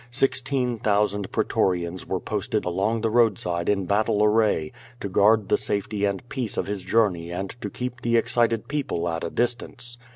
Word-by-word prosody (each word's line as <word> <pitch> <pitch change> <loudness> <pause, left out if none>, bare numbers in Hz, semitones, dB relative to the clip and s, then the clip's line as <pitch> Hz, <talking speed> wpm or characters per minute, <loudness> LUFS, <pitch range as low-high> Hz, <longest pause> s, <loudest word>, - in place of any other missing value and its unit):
Sixteen 130 -1 0
thousand 105 -2 +1
pretorians 90 -1 0
were - - -1
posted - - -2
along 95 +6 0
the 115 -1 0
roadside 95 -7 +2
in 100 -2 +1
battle 105 +2 +2
array, 105 -7 +2 0.3
to - - -3
guard 105 +2 +4
the - - +2
safety 105 0 -1
and 100 +3 -2
peace 125 -5 -3
of - - 0
his 100 -1 -3
journey 90 -6 +1
and 95 +2 -4
to - - -3
keep 125 0 -5
the 115 0 +2
excited 115 -1 +1
people 140 - -2
at 80 -1 -2
a 85 - -2
distance. 120 +1 -2
105 Hz, 170 wpm, -25 LUFS, 95-120 Hz, 0.3 s, guard